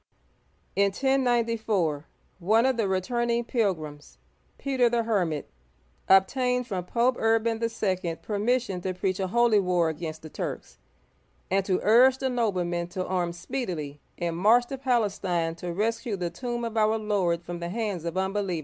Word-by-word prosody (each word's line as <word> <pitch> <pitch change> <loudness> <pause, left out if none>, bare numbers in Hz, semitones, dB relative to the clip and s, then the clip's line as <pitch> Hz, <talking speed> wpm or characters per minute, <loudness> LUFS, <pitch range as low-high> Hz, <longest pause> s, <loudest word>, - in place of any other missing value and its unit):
In 200 - +4
1094, 230 - +1 0.3
one 220 +7 +3
of 265 -1 +2
the 225 -3 0
returning 235 +5 0
pilgrims, 160 - -2 0.4
Peter 260 -3 +2
the 235 0 +1
Hermit, 180 -10 -1 0.6
obtained 250 +6 +3
from 185 -5 -4
Pope 240 +5 +1
Urban 225 0 +1
II. 230 - +2
(a - - -7
Frenchman) 185 -6 -1
permission 210 -2 -1
to 185 0 -3
preach 185 +1 -1
a 190 - 0
holy 235 +1 +4
war 180 -3 +2
against 160 0 -6
the 155 - -8
Turks, - - -6 0.7
and 195 +1 +2
to 185 -2 +1
urge 250 +5 +6
the 265 0 -1
noblemen 180 -8 -1
to 185 +1 -4
arm 180 -2 -1
speedily 170 - -5 0.2
and 170 -1 -2
march 225 +7 +5
to 270 - -5
Palestine 195 -10 0
to 175 +1 -6
rescue 220 +4 -1
the 175 -2 -3
tomb 240 +3 -4
of 230 -1 -5
our 215 0 +3
Lord 190 -6 0
from 175 0 -6
the 170 0 -4
hands 205 -4 -3
of 170 +1 -4
unbelievers. 190 -2 -1
200 Hz, 160 wpm, -27 LUFS, 175-235 Hz, 0.7 s, urge